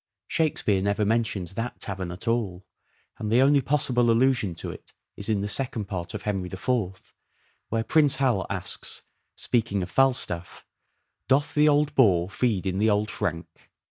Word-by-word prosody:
Shakespeare 110 Hz, -11 st, +1 dB
never 100 Hz, +2 st, 0 dB
mentions 105 Hz, -5 st, -1 dB
that 115 Hz, +3 st, -4 dB
tavern 95 Hz, -3 st, -2 dB
at 90 Hz, +6 st, -8 dB
all, 100 Hz, -6 st, -1 dB, 0.5 s
and 105 Hz, -1 st, -3 dB
the 125 Hz, +3 st, +5 dB
only 140 Hz, +1 st, +4 dB
possible 125 Hz, -3 st, +1 dB
allusion 115 Hz, -6 st, +2 dB
to -, -, -5 dB
it -, -, -13 dB, 0.2 s
is 100 Hz, -, -4 dB
in 105 Hz, -2 st, +1 dB
the 100 Hz, -, -2 dB
Second 120 Hz, -1 st, -1 dB
Part 90 Hz, -3 st, -5 dB
of -, -, -5 dB
Henry 95 Hz, -4 st, -2 dB
the 95 Hz, -, -7 dB
Fourth, 95 Hz, -5 st, -2 dB, 0.6 s
where 115 Hz, 0 st, 0 dB
Prince 145 Hz, +4 st, +4 dB
Hal 125 Hz, -9 st, +1 dB
asks, -, -, -3 dB, 0.3 s
speaking 110 Hz, -5 st, 0 dB
of 90 Hz, -, -7 dB
Falstaff, 125 Hz, -10 st, 0 dB, 0.3 s
' -, -, -52 dB
doth 140 Hz, +2 st, +2 dB
the 150 Hz, 0 st, +5 dB
old 145 Hz, 0 st, +2 dB
boar 95 Hz, -7 st, +3 dB
feed 105 Hz, -5 st, 0 dB
in 95 Hz, 0 st, -1 dB
the 110 Hz, +2 st, +3 dB
old 105 Hz, 0 st, +1 dB
frank 85 Hz, -7 st, -5 dB
110 Hz, 175 wpm, -26 LUFS, 95-125 Hz, 0.6 s, the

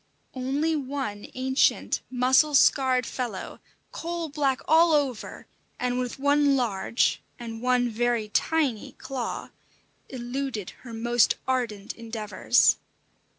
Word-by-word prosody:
Only 275 Hz, +5 st, 0 dB
one 265 Hz, -7 st, -4 dB
ancient, 260 Hz, +1 st, +1 dB
mussel 260 Hz, +4 st, +3 dB
scarred 260 Hz, -2 st, +4 dB
fellow, 235 Hz, -8 st, -5 dB, 0.3 s
coal 335 Hz, -1 st, -4 dB
black 275 Hz, -2 st, 0 dB
all 325 Hz, +1 st, +5 dB
over, 275 Hz, -6 st, -1 dB, 0.3 s
and 250 Hz, 0 st, -1 dB
with 250 Hz, -1 st, -3 dB
one 285 Hz, 0 st, +3 dB
large 230 Hz, -3 st, 0 dB, 0.2 s
and 225 Hz, -1 st, -7 dB
one 250 Hz, 0 st, +2 dB
very 235 Hz, -1 st, 0 dB
tiny 275 Hz, 0 st, 0 dB
claw, 255 Hz, -3 st, -5 dB, 0.6 s
eluded 245 Hz, -4 st, -4 dB
her 240 Hz, -, -10 dB
most 235 Hz, +1 st, +2 dB
ardent 235 Hz, -6 st, -2 dB
endeavours. 225 Hz, 0 st, +2 dB
255 Hz, 110 wpm, -26 LUFS, 235-275 Hz, 0.6 s, all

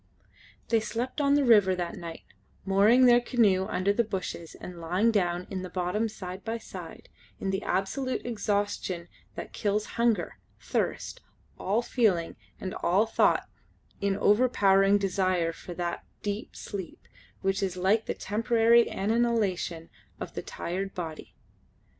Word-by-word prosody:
They 230 Hz, -, +4 dB
slept 235 Hz, +6 st, -3 dB
on 280 Hz, 0 st, +4 dB
the 290 Hz, -, +3 dB
river 205 Hz, -6 st, +5 dB
that 175 Hz, -1 st, -3 dB
night, 170 Hz, -1 st, -8 dB, 0.4 s
mooring 205 Hz, +6 st, +5 dB
their 240 Hz, 0 st, +6 dB
canoe 210 Hz, -7 st, +2 dB
under 195 Hz, +2 st, +1 dB
the 235 Hz, -, +2 dB
bushes 185 Hz, -5 st, -5 dB
and 175 Hz, -2 st, -9 dB
lying 180 Hz, +8 st, +2 dB
down 180 Hz, -4 st, 0 dB
in 190 Hz, -1 st, -3 dB
the 185 Hz, -, -6 dB
bottom 185 Hz, +5 st, -1 dB
side 185 Hz, -2 st, -8 dB
by 225 Hz, 0 st, -2 dB
side, 225 Hz, -, -10 dB, 0.3 s
in 195 Hz, -, -1 dB
the 190 Hz, +1 st, -1 dB
absolute 255 Hz, +9 st, -1 dB
exhaustion 205 Hz, -6 st, -2 dB, 0.3 s
that -, -, -7 dB
kills 210 Hz, +1 st, 0 dB, 0.2 s
hunger, 235 Hz, -2 st, +1 dB, 0.2 s
thirst, -, -, -2 dB, 0.4 s
all 215 Hz, +5 st, 0 dB
feeling 200 Hz, -10 st, +1 dB, 0.2 s
and 185 Hz, -, -5 dB
all 190 Hz, +6 st, +2 dB
thought 225 Hz, -, +2 dB, 0.5 s
in 200 Hz, 0 st, +1 dB
the 195 Hz, -, -5 dB
overpowering 205 Hz, -3 st, +4 dB
desire 185 Hz, -4 st, 0 dB
for 175 Hz, +1 st, -9 dB
that 175 Hz, -1 st, -3 dB, 0.2 s
deep 205 Hz, +1 st, -4 dB
sleep 195 Hz, -4 st, -7 dB, 0.3 s
which 195 Hz, 0 st, 0 dB
is 185 Hz, -2 st, -2 dB
like 200 Hz, +5 st, +2 dB
the -, -, -2 dB
temporary 230 Hz, +2 st, +3 dB
annihilation 200 Hz, -6 st, 0 dB, 0.3 s
of -, -, -6 dB
the -, -, -4 dB
tired 195 Hz, +3 st, -4 dB
body. 165 Hz, -4 st, -6 dB
200 Hz, 145 wpm, -28 LUFS, 185-225 Hz, 0.5 s, their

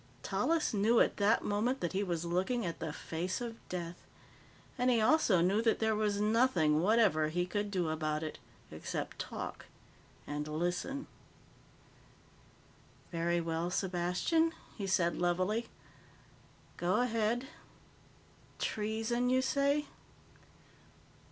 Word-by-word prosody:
Tallis 280 Hz, +11 st, +1 dB
knew 220 Hz, +3 st, +4 dB
at -, -, +3 dB
that 205 Hz, +2 st, +3 dB
moment 225 Hz, +6 st, 0 dB
that 175 Hz, -, -2 dB
he 195 Hz, -, +1 dB
was 175 Hz, -4 st, -2 dB
looking 190 Hz, +7 st, 0 dB
at 170 Hz, -, -4 dB
the 160 Hz, -, -3 dB
face 170 Hz, +6 st, -3 dB
of 235 Hz, -2 st, -6 dB
Death. 175 Hz, -1 st, -4 dB, 0.8 s
And 250 Hz, +1 st, +1 dB
he 240 Hz, -2 st, +4 dB
also 220 Hz, -, +4 dB
knew 195 Hz, +5 st, +3 dB
that 230 Hz, -1 st, +2 dB
there 220 Hz, -1 st, +1 dB
was 210 Hz, -1 st, 0 dB
nothing 210 Hz, -9 st, +3 dB
whatever 195 Hz, -6 st, +4 dB
he 175 Hz, +3 st, 0 dB
could 205 Hz, +3 st, -2 dB
do 185 Hz, -4 st, 0 dB
about 155 Hz, 0 st, -1 dB
it. 155 Hz, -, -5 dB, 0.3 s
Except -, -, -5 dB
talk. -, -, -6 dB, 0.6 s
And 150 Hz, +1 st, -4 dB
listen. 175 Hz, -, -2 dB, 2.1 s
"Very 170 Hz, 0 st, +1 dB
well, 165 Hz, +1 st, -2 dB
Sepastian," 185 Hz, -, +1 dB, 0.2 s
he 200 Hz, -3 st, -4 dB
said 170 Hz, -2 st, +1 dB
levelly. 185 Hz, +6 st, 0 dB, 1.1 s
"Go 175 Hz, +1 st, +1 dB
ahead. 235 Hz, +1 st, 0 dB, 1.1 s
Treason, 225 Hz, +3 st, -1 dB
you 260 Hz, +1 st, +3 dB
say? 280 Hz, +2 st, +2 dB
200 Hz, 120 wpm, -33 LUFS, 175-230 Hz, 2.1 s, knew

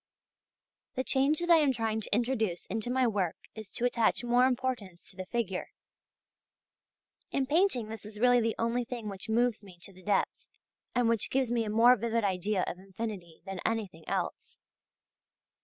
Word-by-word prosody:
The 260 Hz, -, 0 dB
change 275 Hz, +5 st, +2 dB
that 345 Hz, 0 st, +1 dB
I 335 Hz, -, +9 dB
am 295 Hz, -4 st, +4 dB
trying 225 Hz, -3 st, -1 dB
to 205 Hz, -, 0 dB
introduce 225 Hz, -7 st, 0 dB
into 220 Hz, +3 st, -3 dB
my 255 Hz, +1 st, +2 dB
work 200 Hz, -7 st, 0 dB, 0.2 s
is 220 Hz, -2 st, -8 dB
to 240 Hz, -, -1 dB
attach 240 Hz, -1 st, +2 dB
more 245 Hz, +1 st, +4 dB
importance 245 Hz, -8 st, -3 dB
to -, -, -18 dB
the 185 Hz, -1 st, -6 dB
figure. 200 Hz, -5 st, -2 dB, 1.6 s
In 275 Hz, -, 0 dB
painting 295 Hz, -, +2 dB
this 220 Hz, -1 st, -7 dB
is 210 Hz, 0 st, -10 dB
really 245 Hz, +1 st, +5 dB
the 225 Hz, 0 st, 0 dB
only 235 Hz, +2 st, 0 dB
thing 235 Hz, -3 st, -5 dB
which 200 Hz, +2 st, -7 dB
moves 235 Hz, 0 st, +2 dB
me 185 Hz, -3 st, -14 dB
to 195 Hz, -, -9 dB
the 185 Hz, -, -16 dB
depths, 200 Hz, +1 st, -1 dB, 0.5 s
and 245 Hz, -1 st, +3 dB
which 230 Hz, -2 st, +2 dB
gives 260 Hz, -2 st, +1 dB
me 235 Hz, -2 st, +1 dB
a -, -, -3 dB
more 230 Hz, +4 st, +6 dB
vivid 230 Hz, 0 st, -1 dB
idea 190 Hz, 0 st, 0 dB
of 180 Hz, -, -5 dB
infinity 190 Hz, -4 st, -7 dB
than 195 Hz, -1 st, -5 dB
anything 205 Hz, -8 st, -2 dB
else. -, -, -3 dB
225 Hz, 175 wpm, -30 LUFS, 200-245 Hz, 1.6 s, I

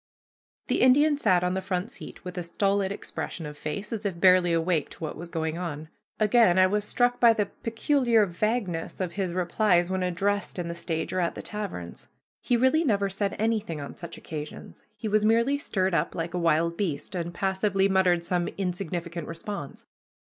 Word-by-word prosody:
The -, -, 0 dB
Indian 290 Hz, +4 st, +5 dB
sat 185 Hz, -10 st, +2 dB
on 180 Hz, 0 st, +1 dB
the 190 Hz, -, -1 dB
front 185 Hz, +4 st, -2 dB
seat 270 Hz, -, -11 dB
with 180 Hz, -, -6 dB
a 180 Hz, -, -2 dB
stolid 195 Hz, +3 st, 0 dB
expression 180 Hz, -4 st, -5 dB
of 150 Hz, 0 st, -7 dB
face 175 Hz, +9 st, -5 dB
as 220 Hz, -1 st, -4 dB
if 190 Hz, -5 st, -3 dB
barely 180 Hz, -1 st, +5 dB
awake 165 Hz, -2 st, +1 dB
to -, -, -11 dB
what 155 Hz, -, -4 dB
was 170 Hz, +2 st, -8 dB
going 160 Hz, 0 st, -2 dB
on. 155 Hz, -3 st, -5 dB, 0.3 s
Again 215 Hz, -4 st, +4 dB
I 185 Hz, -, +7 dB
was 205 Hz, +2 st, 0 dB
struck 245 Hz, +2 st, +1 dB
by 235 Hz, -2 st, +7 dB
the 210 Hz, -2 st, 0 dB
peculiar 230 Hz, +1 st, +1 dB
vagueness 185 Hz, -2 st, -2 dB
of 185 Hz, -3 st, -2 dB
his 190 Hz, -1 st, -2 dB
replies 180 Hz, 0 st, +2 dB
when 190 Hz, 0 st, 0 dB
addressed 195 Hz, +3 st, -1 dB
in 175 Hz, -1 st, -3 dB
the -, -, -3 dB
stage 165 Hz, -1 st, -3 dB
or 185 Hz, -, 0 dB
at 170 Hz, -2 st, 0 dB
the -, -, -7 dB
taverns. 195 Hz, -, -6 dB, 0.3 s
He 245 Hz, -, +2 dB
really 260 Hz, +7 st, +3 dB
never 200 Hz, -8 st, +1 dB
said 195 Hz, +1 st, -1 dB
anything 215 Hz, -7 st, -1 dB
on 140 Hz, -, -7 dB
such 170 Hz, -, -8 dB
occasions. 150 Hz, -1 st, -8 dB, 0.2 s
He 215 Hz, -, -4 dB
was 215 Hz, 0 st, +2 dB
merely 235 Hz, +6 st, +3 dB
stirred 190 Hz, -8 st, 0 dB
up -, -, 0 dB
like 170 Hz, +1 st, -3 dB
a 180 Hz, -, -1 dB
wild 170 Hz, 0 st, +2 dB
beast, 170 Hz, -7 st, -2 dB
and 175 Hz, -2 st, -3 dB
passively 195 Hz, +1 st, +1 dB
muttered 185 Hz, -3 st, +2 dB
some 175 Hz, -1 st, 0 dB
insignificant 175 Hz, -3 st, -3 dB
response. 165 Hz, -2 st, -6 dB
185 Hz, 195 wpm, -27 LUFS, 170-210 Hz, 0.3 s, I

